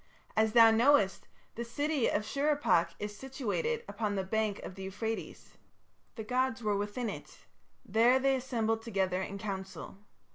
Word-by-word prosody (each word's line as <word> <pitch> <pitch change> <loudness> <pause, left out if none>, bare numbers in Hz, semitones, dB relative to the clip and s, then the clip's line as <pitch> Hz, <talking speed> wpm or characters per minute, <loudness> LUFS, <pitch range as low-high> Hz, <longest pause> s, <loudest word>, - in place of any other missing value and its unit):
As 220 0 +2
thou 230 -1 +8
knowest, 225 -5 +3 0.3
the 235 - -4
city 285 +3 0
of 210 - 0
Shurippak 275 - +1
is 210 0 -5
situated 270 - -2
upon 210 -2 -2
the 190 - -1
bank 215 +1 -1
of - - -7
the 195 - -10
Euphrates. 220 +4 -5 0.6
The 220 - -5
gods 255 +1 -1
were 210 -1 +1
within 205 +4 -2
it: - - -8 0.4
there 235 +4 +4
they 270 0 +2
assembled 230 -4 -1
together 190 -5 -1
in 200 +1 -5
council. 195 -1 -6
220 Hz, 150 wpm, -31 LUFS, 200-255 Hz, 0.6 s, thou